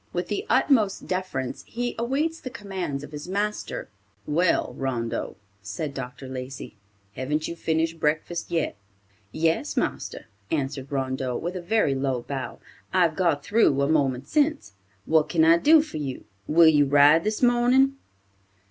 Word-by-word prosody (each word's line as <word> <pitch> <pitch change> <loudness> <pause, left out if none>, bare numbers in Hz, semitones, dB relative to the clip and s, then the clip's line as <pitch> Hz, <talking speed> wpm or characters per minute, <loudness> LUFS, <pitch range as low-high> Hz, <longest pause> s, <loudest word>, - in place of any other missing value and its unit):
With 175 0 -3
the 205 - -3
utmost 220 -9 +2
deference, 185 -9 -3
he 245 +1 -3
awaits 295 +7 -1
the 255 - -7
commands 190 - -5
of 145 - -10
his 150 +2 -7
master. 205 +3 -3 0.4
"Well, 165 -4 +1
Rondeau," 120 -4 -3 0.3
said 105 +9 -5
Dr. 130 0 -7
Lacey, 130 -1 -7 0.4
"haven't 150 +6 -2
you 170 - -5
finished 165 0 -1
breakfast 155 +3 -1
yet?" 165 -9 -1 0.6
"Yes, 160 +1 0
marster," - - -2 0.2
answered 140 -2 -3
Rondeau, 130 -2 -2
with 175 +3 -4
a 180 - -4
very 200 -5 +1
low 135 -2 -1
bow. 130 -4 -5 0.3
"I've 175 -4 +3
got 165 -6 +1
through 200 -10 +3
a 140 - +2
moment 140 -4 +1
since. 300 - 0 0.3
What 160 -1 +3
can 160 -2 +3
I 165 +1 +6
do 310 - +6
for 305 - -7
you. 140 -4 -5 0.2
Will 165 +1 +6
you 145 -2 +5
ride 145 +3 +6
this 215 +3 -2
morning?" 250 +3 +4
160 Hz, 150 wpm, -25 LUFS, 135-200 Hz, 0.6 s, I